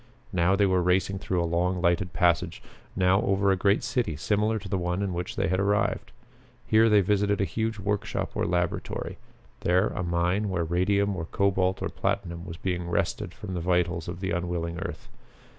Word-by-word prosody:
Now 90 +2 +3
they 100 +1 +3
were 95 -1 +2
racing 95 +2 +1
through 90 -2 -1
a - - 0
long 90 +2 0
lighted 85 +1 +1
passage; 85 -1 +1 0.3
now 95 +1 +3
over 100 0 +2
a - - +4
great 100 +4 +2
city 125 - -1
similar 105 +8 +1
to 100 -2 -7
the 95 0 -1
one 90 +2 -1
in 95 -2 -2
which 85 0 -4
they - - 0
had 95 +2 +1
arrived. 100 +1 0 0.5
Here 110 +1 +5
they 105 -1 +6
visited 100 +1 +1
a - - +3
huge 110 +2 -2
workshop 100 +1 -2
or - - -1
laboratory; 90 -1 -2 0.4
there 90 +3 +2
a - - -4
mine 90 +4 0
where 90 -3 0
radium 100 +4 +1
or 80 -3 -4
cobalt 95 +1 +1
or - - -1
platinum 85 -3 -2
was 85 -1 -7
being 90 -2 -3
wrested - - -1
from 95 -3 -8
the 90 - -2
vitals 90 -1 0
of 85 +1 -6
the 95 - -2
unwilling 85 -1 -2
earth. - - -6
95 Hz, 190 wpm, -27 LUFS, 85-100 Hz, 0.5 s, they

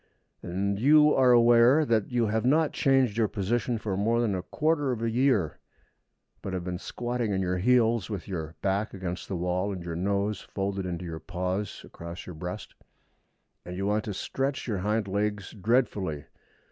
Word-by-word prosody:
And 100 +3 -2
you 150 +4 +6
are 130 -1 +5
aware 120 +5 +6
that 115 -5 +1
you 120 -2 +2
have 110 +1 0
not 150 +4 +3
changed 135 -5 +2
your 110 - +3
position 115 +4 -1
for 105 -3 -3
more 115 +4 +1
than 115 -4 +1
a 95 - -2
quarter 150 - 0
of 115 -2 -3
a 115 - 0
year, 120 - +1 0.8
but 95 - -5
have 90 -1 -2
been 90 0 -4
squatting 120 0 -3
on 95 - 0
your 90 0 -1
heels, 115 -1 +3
with 100 -5 -5
your 80 -4 -5
back 100 +2 0
against 90 -2 -5
the 95 - -3
wall 90 +3 -1
and 90 -3 -5
your 85 -1 -5
nose 100 +3 -1
folded 95 -1 -3
into 90 0 -4
your 80 -2 -5
paws 90 +3 -3
across 85 +1 -9
your 90 - -8
breast; 90 +3 -7 0.9
and 90 +1 -7
you 95 - -2
want 105 +1 +1
to 105 - -3
stretch 135 +7 -2
your 105 -5 -1
hind 105 +2 0
legs 100 0 -2
dreadfully. 105 - 0
105 Hz, 185 wpm, -27 LUFS, 90-120 Hz, 0.9 s, you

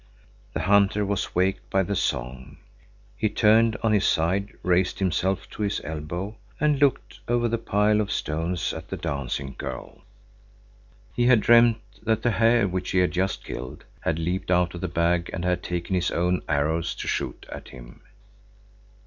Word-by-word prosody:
The - - -2
hunter 100 +1 +3
was 100 0 -2
waked 95 +1 0
by 95 0 +2
the 100 +2 -2
song. 65 0 -3 0.6
He 110 - 0
turned 110 +2 +4
on 110 -1 +3
his 100 -3 +3
side, 95 +6 +1
raised 90 +1 +2
himself 95 0 0
to - - -8
his 100 -1 0
elbow, 80 +7 -5 0.2
and 150 -2 +2
looked 140 -3 +1
over 120 0 +2
the 115 0 -1
pile 105 0 +2
of 100 -1 -3
stones 80 0 -2
at - - -8
the - - -4
dancing 70 -1 -3
girl. 65 -1 -7 1.1
He 120 0 +2
had 125 -3 +6
dreamt 115 0 +5 0.2
that 110 -1 0
the 120 - +3
hare 115 -1 +3
which 90 0 -3
he - - 0
had 90 -2 +3
just 95 +2 -1
killed 65 +1 -7 0.2
had 80 - -1
leaped 90 +3 -2
out 90 -1 +2
of 85 - -7
the 95 - -1
bag 85 0 +1
and 85 - -3
had 90 -1 +1
taken 90 +1 -3
his 90 -2 +1
own 90 +1 0
arrows 75 +3 0
to - - -6
shoot - - -3
at - - -8
him. - - -13
95 Hz, 175 wpm, -25 LUFS, 85-105 Hz, 1.1 s, had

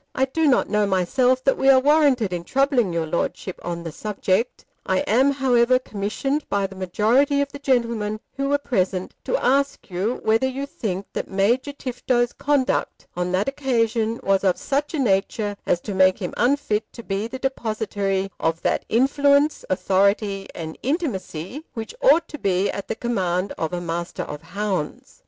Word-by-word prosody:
I 265 - +3
do 315 +4 0
not 265 - +3
know 210 -1 +1
myself 250 +8 +2
that 270 - +2
we 270 - +4
are 265 -1 +8
warranted 275 -8 +3
in 175 -1 -3
troubling 265 - +2
your 165 -1 -1
Lordship 170 +3 -3
on 170 -1 -4
the 165 - -5
subject. 210 +5 -1 0.2
I 190 0 +1
am, 255 +6 +3
however, 255 -2 +3
commissioned 255 +6 -2
by 200 -1 +1
the 195 0 -7
majority 225 - +2
of 280 0 0
the 285 - -8
gentlemen 230 -6 0 0.2
who 275 0 -1
were 285 - +3
present 190 -9 -1
to - - +1
ask 280 - 0
you 195 +7 -1
whether 225 +4 +3
you 270 +2 -3
think 200 -8 -4
that - - -4
Major 235 +9 +1
Tifto's 250 -3 -1
conduct 285 -2 0
on 180 0 -1
that 190 +5 +1
occasion 230 -5 0
was 195 0 +2
of 185 -2 +2
such 290 +3 -1
a - - -2
nature 205 -2 0
as 175 - +2
to 205 - -5
make 185 0 +4
him 180 -4 -5
unfit 240 -3 0
to 235 - -9
be 200 +1 -2
the 250 +3 -6
depositary 215 -7 -2
of 165 0 0
that - - 0
influence, 280 +4 +3
authority, 195 +1 +1
and 160 -1 -7
intimacy 255 - -3
which 225 -1 -5
ought - - +5
to 300 - -8
be 190 -2 +1
at 200 - -6
the - - -2
command 190 -6 -1
of 160 - -3
a 180 - -2
Master 170 0 -4
of 150 0 -7
Hounds. 185 -2 -4
220 Hz, 175 wpm, -23 LUFS, 190-270 Hz, 0.2 s, are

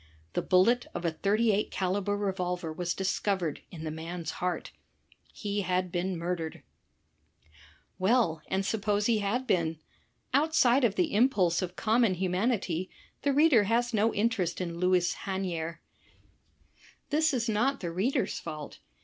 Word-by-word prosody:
The - - 0
bullet 230 +7 +3
of 175 - -4
a 165 - +2
.38 210 +5 +1
caliber 195 +2 -1
revolver 180 -4 -2
was 175 +1 -2
discovered 190 -3 -1
in 160 -3 -9
the 155 - -3
man's 165 +1 -5
heart. 180 0 -2 0.6
He 205 -1 -3
had 185 -1 -1
been 180 +1 -1
murdered. 170 -1 -4 1.4
Well, 185 -5 +2
and 195 +1 -1
suppose 205 -1 0
he 225 -1 +3
had 215 +6 -1
been. 165 -8 +1 0.6
Outside 280 -3 +4
of 215 -4 +3
the 180 - +1
impulse 200 -7 +3
of 180 -1 -4
common 225 -2 +2
humanity, 185 -1 -1 0.3
the 285 - +2
reader 275 -7 +5
has 235 +3 +1
no 220 +1 +3
interest 205 -6 0
in 170 -2 -4
Louis 180 -1 +2
Hanier. 175 -4 -3 1.3
This 310 +1 +3
is 245 -4 -1
not 240 +6 +1
the 170 -3 -4
reader's 195 +10 0
fault. 155 -3 -7
190 Hz, 140 wpm, -29 LUFS, 175-225 Hz, 1.4 s, reader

